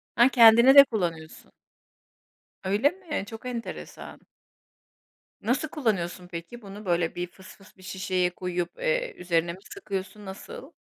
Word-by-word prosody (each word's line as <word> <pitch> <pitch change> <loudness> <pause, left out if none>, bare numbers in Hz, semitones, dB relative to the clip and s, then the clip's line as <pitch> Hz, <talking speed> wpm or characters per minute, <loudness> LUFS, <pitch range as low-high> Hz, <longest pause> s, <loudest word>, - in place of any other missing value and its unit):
Ha, 240 +1 +6
kendine 235 +1 +7
de 280 - +12
kullanıyorsun. 170 - -5 1.1
Öyle 205 +9 +2
mi? 345 - -5
Çok 225 +2 -10
enteresan. 240 -2 -7 1.2
Nasıl 250 +8 0
kullanıyorsun 185 - -2
peki? 175 +7 -8
Bunu 205 +1 -10
böyle 170 -2 0
bir 180 0 -3
fısfıs 190 +2 -17
bir 185 - -17
şişeye 185 -1 -1
koyup, 180 -1 -4
eee, - - -1
üzerine 170 -1 0
mi 185 - -13
sıkıyorsun, 200 - -6
nasıl? 205 - -9
195 Hz, 125 wpm, -26 LUFS, 180-245 Hz, 1.2 s, de